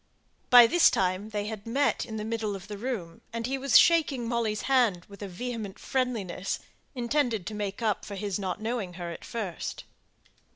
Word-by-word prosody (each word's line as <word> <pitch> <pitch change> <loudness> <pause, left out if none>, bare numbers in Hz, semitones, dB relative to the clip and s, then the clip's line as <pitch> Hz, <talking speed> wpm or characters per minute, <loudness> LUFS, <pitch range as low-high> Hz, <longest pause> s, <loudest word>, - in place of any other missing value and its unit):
By 245 -1 +10
this 345 +8 +6
time, 185 +3 0
they 205 -1 -2
had 215 0 -6
met 275 +3 +1
in 220 -2 -5
the 215 - -4
middle 220 -2 -2
of 195 0 -9
the 210 - -6
room, 205 -9 -4
and 230 0 -3
he 270 +2 -2
was 275 -1 +6
shaking 295 -8 +4
Molly's 230 -3 -1
hand 235 -10 +2
with 200 0 -13
vehement 205 +1 -5
friendliness, 225 -8 -2 0.4
intended 240 -5 0
to 215 - -5
make 205 +1 -4
up 215 -3 +1
for 200 - -7
his 200 0 -2
not 185 -2 -3
knowing 220 -4 -3
her 175 -1 -5
at - - -9
first. 205 -7 -5
220 Hz, 180 wpm, -28 LUFS, 195-245 Hz, 0.4 s, By